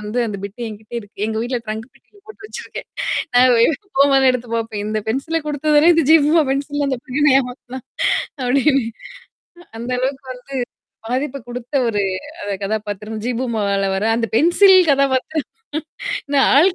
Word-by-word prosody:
வந்து 210 +3 -4
அந்தப் 200 -3 -5
பிட்டு 200 +4 -8
என்கிட்ட 215 +1 -11
இருக்கு. 205 -1 -10
எங்க 220 0 -3
வீட்டுல 245 0 -2
ட்ரங்க்கு 220 +3 -5
பெட்டியில 400 +9 -24
போட்டு 410 -2 -12
வச்சிருக்கேன். - - -8 0.5
நான் 250 +1 +6 0.5
போம்போதெல்லாம் 275 -1 +5
எடுத்துப் 240 -2 -3
பாப்பேன். 225 -2 -3
"இந்தப் 215 0 -3
பென்சில 275 +8 -1
குடுத்ததானே 300 +3 +4
இந்த 325 -4 +2
ஜீ - - +9
பூம்பா 315 +1 +4
பென்சில்ன்னு 285 +1 -1
அந்தப் 260 -3 -3
பையன் 265 +3 -3
என்ன 285 -3 +5
ஏமாத்துனான்?" 250 0 -7 0.6
அப்டின்னு 270 +1 +2 0.8
அ - - -18
அந்த 240 +2 -5
அளவுக்கு 265 +1 -2
வந்து, 250 -1 -11 0.6
பாதிப்ப 265 +3 -2
குடுத்த 245 +3 -8
ஒரு, 210 -3 0 0.4
அந்த 205 0 -3
கதாபாத்திரம் 210 +1 -4
ஜீ 250 - 0
பூம்பால 200 -5 0
வர்ற 210 +3 0
அந்த 230 -2 -1
பென்சில் 375 - +6
கதாபாத்திரம். 275 +2 +1 0.8
இந்த 285 - +1 0.2
ஆள் 330 +8 +6
250 Hz, 160 wpm, -19 LUFS, 220-285 Hz, 0.8 s, ஜீ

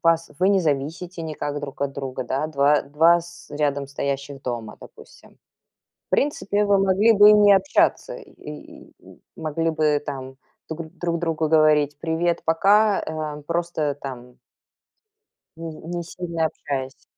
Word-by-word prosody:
пас 165 -1 +2
вы 185 +2 +3
не 200 -1 +4
зависите 165 +3 -2
никак 145 -2 -4
друг 140 -1 -6
от 140 -1 -1
друга, 130 -2 -5
да? 135 +5 -1
Два 145 -1 +3
два 160 +5 +4
с 175 +1 -14
рядом 145 -1 -1
стоящих 140 0 -4
дома, 115 -4 -5
допустим. - - -16 0.7
В - - -65
принципе, 210 -8 +1
вы 200 -1 +3
могли 195 +4 +4
бы 205 0 +8
и - - +8
не 205 -1 +6
общаться. 195 - +2
И - - -11 0.3
и - - -12
м - - -16 0.2
могли 165 +1 -2
бы 155 -2 +1
там 130 -2 -7 0.3
тугн 160 0 -7
друг 170 -1 -1
другу 160 -2 -1
говорить: 150 -2 +3
"Привет- 165 +1 -1
пока", 200 +6 +3
эм, 155 -2 -5
просто 170 +1 -2
э, - - -3
там 125 -3 -9 1.2
ни 165 - -5 0.2
не 175 - -2
сильно 170 -3 -2
общаясь. 135 -3 -5
160 Hz, 155 wpm, -23 LUFS, 140-175 Hz, 1.2 s, бы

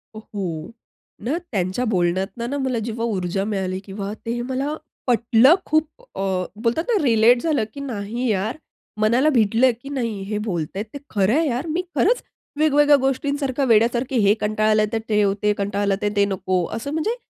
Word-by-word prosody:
हो. 190 -7 -5 0.5
ना, 255 +10 -1
त्यांच्या 190 +3 -1
बोलण्यातनं 190 +5 -1
ना 285 - -2
मला, 260 -4 -1
जेव्हा 230 +1 -3
ऊर्जा 195 -3 -1
मिळाली 190 -3 -2
किंवा 200 +1 -5
ते 235 +1 -2
मला 265 +4 -2 0.3
पटलं 240 +4 +5
खूप 310 0 +2 0.3
अ, - - 0 0.3
बोलतात 230 +8 0
ना 455 -5 +2
रिलेट 240 -1 +5
झालं, 305 -8 +1
की 280 - -8
"नाही 240 -2 -3
यार," 210 +4 -1 0.4
मनाला 240 +7 +4
भिडलं 230 +2 +4
की 275 - -9
"नाही 230 -7 -3
हे 210 - 0
बोलतायेत 185 +2 -3
ते - - -5
खरं 200 0 +2
आहे 315 +3 +2
यार, 260 +4 -2
मी 330 +3 0
खरंच - - +2 0.4
वेगवेगळ्या 295 -1 +5
गोष्टींसारखं 275 0 -1
वेड्यासारखे 235 +3 +2
हे 200 - +6
कंटाळलं 215 0 +2
तर 225 - +1
ते, 210 -1 +3 0.2
ते 210 0 +3
कंटाळलं 200 0 0
तर 210 - +1
ते 200 0 +4
नको. 185 -2 -1
असं 240 +6 -4
म्हणजे 375 +9 0
230 Hz, 165 wpm, -22 LUFS, 200-265 Hz, 0.5 s, हे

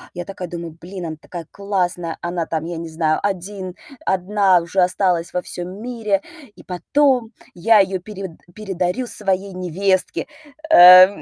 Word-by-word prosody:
Я 175 - -5
такая 185 -1 -7
думаю: 170 -2 -7
"Блин, 185 0 -7
она 160 - -5
такая 170 -2 -8
классная, 180 -4 -2
она, 175 -1 -2
там, 160 -1 -3
я 170 0 -5
не 165 0 -6
знаю, 160 -1 0
один 190 -1 -4 0.3
одна 190 0 +3
уже 175 +3 0
осталась 180 -2 +1
во 180 - 0
всём 180 +3 -7
мире, 225 -5 -1 0.3
и - - -15
потом 245 - +1 0.2
я 210 +5 +5
её 190 -1 +1
перев 190 -1 -8 0.2
передарю 190 +2 -2
своей 195 -2 -2
невестке". 185 +1 -1 0.4
Э, 185 - +11
185 Hz, 150 wpm, -20 LUFS, 175-200 Hz, 0.4 s, Э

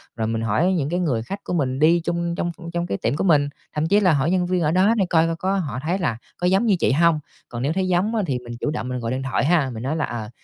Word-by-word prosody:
rồi 110 -1 -2
mình 115 0 -1
hỏi 115 - +1
những 150 -6 -1
cái 175 +2 -1
người 130 -11 0
khách 195 - -7
của - - -4
mình 135 -6 0
đi 165 +3 +5
chung 170 0 -2
trong 175 -1 -2 0.2
trong 175 0 -1
cái 100 - -2
tiệm - - -1
của - - -1
mình, 150 -6 +3 0.2
thậm 155 +1 0
chí 200 +5 +4
là 185 -5 +4
hỏi 145 +3 +1
nhân 185 -1 +2
viên 180 0 0
ở 155 -1 +2
đó 190 +6 +4
để 195 - +2
coi 165 -1 +3
coi 165 - -1
có 190 +3 -1
họ 155 -10 -2
thấy 175 +5 -1
là 150 -11 -1 0.2
có 180 - 0
giống 190 +5 +3
như 210 -4 +4
chị - - +2
hông. 165 +3 +3 0.3
Còn 120 -1 -5
nếu 145 +4 0
thấy 190 +1 0
giống 185 +5 +1
á 220 - +2
thì 135 -6 -1
mình 120 -1 -9
chủ - - -1
động 125 -5 -4
mình 125 0 -3
gọi 115 -1 -3
điện 130 +1 -2
thoại 135 0 0
ha, 155 -4 +2
mình 110 0 -6
nói 140 +4 -1
là 155 - 0
"Ờ, 110 -3 -6
165 Hz, 315 wpm, -22 LUFS, 130-180 Hz, 0.3 s, đi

